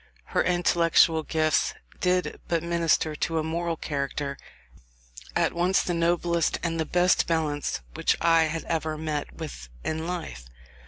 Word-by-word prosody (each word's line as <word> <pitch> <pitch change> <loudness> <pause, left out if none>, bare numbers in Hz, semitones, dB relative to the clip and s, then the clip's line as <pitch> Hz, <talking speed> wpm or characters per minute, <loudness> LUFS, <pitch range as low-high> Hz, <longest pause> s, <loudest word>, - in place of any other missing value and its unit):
Her - - +3
intellectual 170 -2 +3
gifts 155 0 +1 0.2
did 180 0 0
but 170 -1 0
minister 170 -2 +1
to 165 +2 -1
a 155 - +1
moral 165 +1 -2
character 140 -1 -3 1.0
at - - +2
once 180 +3 +2
the 175 - -1
noblest 170 0 +1
and 165 -1 -1
the 160 - +1
best 180 +2 +3
balanced 150 - -1
which - - +1
I 165 -1 +4
have 160 +1 -3
ever 160 -1 -2
met 150 -2 -3
with 145 - -8
in 160 +1 -2
life. 160 - -5
165 Hz, 145 wpm, -26 LUFS, 155-170 Hz, 1.0 s, I